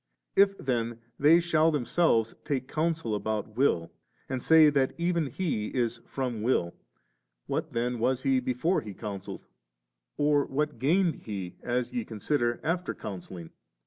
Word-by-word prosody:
If 195 0 +5
then 120 -3 -1 0.2
they 155 +4 +6
shall 165 -2 +3
themselves 140 -5 +2
take 130 -3 -2
counsel 160 -7 -1
about 105 +1 -3
will, 85 -11 +1 0.4
and 130 -1 -3
say 160 0 +7
that 135 -2 +1
even 170 -2 0
He 135 - -2
is 120 -1 -1
from 125 -5 -3
will, 105 -7 +1 0.7
what - - -3
then 120 +1 -1
was 130 +2 +1
He 135 -1 +3
before 130 +9 0
He 105 -3 -8
coun 100 -2 -5
selled, - - -9 0.7
or 145 -1 +3
what 150 -1 -2
gained 165 +6 +2
He, 95 -4 -5
as 125 0 -2
ye 245 -2 -1
consider, 120 - -1
after 175 +2 -1
counselling? 90 -4 -8
130 Hz, 145 wpm, -28 LUFS, 115-155 Hz, 0.7 s, say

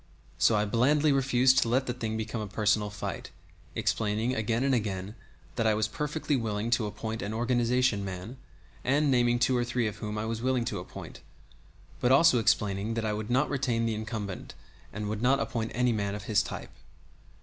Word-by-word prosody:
So 115 - +4
I 105 0 +2
blandly 145 +8 +3
refused 130 -1 +4
to 115 - +1
let 130 +3 +2
the 125 - -2
thing 110 -3 -3
become 110 0 -3
a 105 - -4
personal 105 0 +1
fight, 105 - -5 0.5
explaining 110 +3 0
again 115 +1 0
and 135 0 +2
again 100 -4 -2 0.4
that 115 -2 +2
I 110 - +3
was 110 0 +1
perfectly 150 +4 -2
willing 110 -2 -2
to 110 -2 +2
appoint 110 +2 -5
an 105 +2 -3
organization 120 -2 +1
man, 95 +6 -6 0.5
and 145 +2 +2
naming 120 -1 +3
two 125 +1 +2
or 120 - +2
three 120 -1 0
whom 105 0 -5
I 105 - -2
was 115 0 -3
willing 130 -1 +1
to 120 - -3
appoint, - - -9 0.8
but 125 - +2
also 135 -2 +6
explaining 105 0 +1
that 115 -1 -1
I 105 - 0
would 105 +1 -4
not 130 +4 +2
retain 125 -4 0
the 115 - 0
incumbent, 110 -3 -5 0.4
and 105 0 -4
would 105 +1 -3
not 130 +3 +3
appoint 115 -4 -2
any 125 0 +2
man 100 -2 -1
of 105 - -7
his 105 -1 +2
type. - - -7
115 Hz, 195 wpm, -29 LUFS, 105-125 Hz, 0.8 s, also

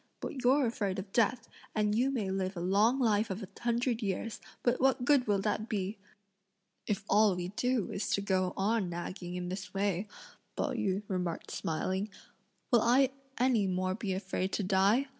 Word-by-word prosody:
but 265 - -5
you're 265 +3 +4
afraid 210 -5 -1
of 195 +1 -6
death; 230 +1 +2 0.3
and 210 -1 +2
you 245 +5 +2
may 220 -8 -1
live 190 0 -2
a - - -3
long 205 +8 +3
life 220 -3 +2
of 195 +3 -4
a - - -6
hundred 240 0 0
years, 210 +2 -3 0.2
but 245 +1 +2
what 260 -1 +3
good 280 -4 +4
will 205 -1 +3
that 210 +3 -1
be!" 200 -1 -2 0.9
"If 200 -1 -1
all 205 -2 +4
we 180 0 -3
do 245 +1 0
is 195 - -2
to 200 - -2
go 185 -2 0
on 205 -1 +1
nagging 175 +1 -5
in 180 0 -3
this 185 0 -6
way," 195 0 0 0.5
Pao - - 0
yü 210 -5 -1
remarked 180 -3 -3
smiling, 190 +5 -2 0.6
"will 240 -3 +6
I 255 +3 +4 0.3
any 240 -5 +3
more 185 0 0
be 195 -1 -2
afraid 185 0 -2
to 205 - 0
die? 200 +8 +3
205 Hz, 180 wpm, -31 LUFS, 190-235 Hz, 0.9 s, will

